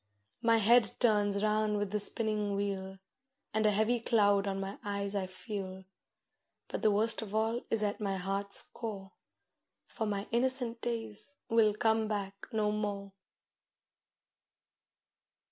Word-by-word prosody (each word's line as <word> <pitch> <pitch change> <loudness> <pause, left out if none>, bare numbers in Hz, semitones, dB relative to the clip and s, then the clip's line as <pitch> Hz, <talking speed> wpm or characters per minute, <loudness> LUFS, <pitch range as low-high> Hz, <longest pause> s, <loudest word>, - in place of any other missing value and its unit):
My 230 0 +4
head 225 0 +5
turns 205 -3 +3
round 215 0 +1
with 205 -1 -2
the 210 - 0
spinning 210 -1 0
wheel, 195 -1 -3 0.6
And 215 0 +2
a - - +4
heavy 220 +4 +2
cloud 205 -3 +3
on 195 0 -2
my 195 +1 -5
eyes 200 -1 -2
I 195 -2 -1
feel. 185 0 -6 0.8
But - - -4
the 215 - +4
worst 220 +3 +2
of 215 -1 -6
all 225 +2 +1
is 225 -1 +1
at 205 +1 -2
my 195 -2 -1
heart's 195 +2 +2
core; 200 -4 -7 0.7
For 220 - -4
my 200 0 -2
innocent 240 -1 +1
days 230 +3 -3
will 220 -2 +4
come 220 0 +2
back 200 -2 -3 0.2
no 215 -1 +1
more. 205 -2 -3
210 Hz, 140 wpm, -32 LUFS, 200-225 Hz, 0.8 s, head